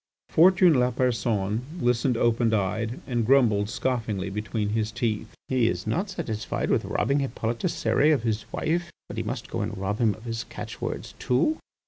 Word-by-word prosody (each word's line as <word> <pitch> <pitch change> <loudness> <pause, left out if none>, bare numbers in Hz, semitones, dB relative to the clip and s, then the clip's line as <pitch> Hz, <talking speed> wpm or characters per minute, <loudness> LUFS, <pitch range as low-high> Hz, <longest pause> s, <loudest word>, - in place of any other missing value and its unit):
Fortuné 175 0 +6
Lapersonne 115 -4 +1 0.2
listened 125 -2 +2
open 115 0 +2
eyed, 110 +4 -1
and 120 -3 0
grumbled 110 -5 +3
scoffingly 110 -7 -2
between 105 +1 -2
his 110 0 -1
teeth: 115 -3 -2
"He 125 -3 +2
is 90 -5 -2
not 180 - -1
satisfied 125 - -3
with - - +2
robbing 140 +1 +1
Hippolyte 115 -3 -2
Cérès 125 +8 +2
of 130 - -4
his 110 -2 -2
wife, 170 +2 -1 0.2
but - - -8
he - - 0
must - - -4
go - - -2
and - - -3
rob 100 +2 -2
him 110 -4 +3
of 110 - -15
his 115 -1 -3
catchwords - - -6
too." 140 - +1
115 Hz, 165 wpm, -26 LUFS, 110-130 Hz, 0.2 s, Fortuné